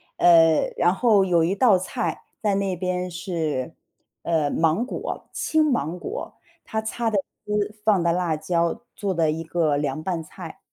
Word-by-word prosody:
呃， 165 -2 +6 0.2
然 175 +2 +3
后 210 -4 +4
有 170 -3 +3
一 180 +4 +1
道 210 -2 +5
菜 185 - -3 0.2
在 205 -2 +1
那 195 -1 0
边 180 0 -2
是， 165 -7 -3 0.5
呃， 160 -4 +1
芒 165 +10 +1
果 - - -5
青 315 -1 +1
芒 180 - -1
果。 475 - -6 0.3
它 220 0 -1
擦 225 +1 -2
的 210 - 0 0.3
丝， 210 0 -1
放 200 -5 +4
的 170 - +3
辣 175 -2 0
椒， 170 +7 -1
做 200 -2 -2
的 165 -3 +2
一 160 - -3
个 160 -3 +1
凉 145 +1 -2
拌 175 -3 -2
菜。 - - -10
180 Hz, 180 characters per minute, -24 LUFS, 165-205 Hz, 0.5 s, 呃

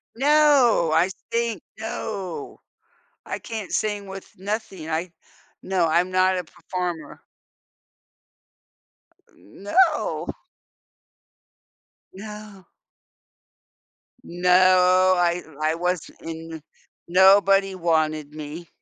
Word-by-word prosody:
No! 275 - +4
I 170 +4 +3 0.2
think, 235 -2 -1 0.2
no. 200 -5 -6 0.7
I - - -5
can't 220 -4 -7
sing 205 -2 -1
with 195 0 -9
nothing, 195 -4 -5
I 165 +2 -2 0.5
No, 185 -3 +1
I'm 175 +3 +1
not 185 0 +2
a 180 - -3
performer. 175 0 -6 2.1
No! 305 - 0 1.9
No. 210 -1 -10 1.6
No. 185 +1 +4
I 175 0 +1 0.2
I 155 +1 +1
wasn't 180 0 -3
in 165 -1 -8 0.5
nobody 195 +1 +5
wanted 155 -4 0
me. 155 +3 -8
185 Hz, 80 wpm, -23 LUFS, 170-205 Hz, 2.1 s, nobody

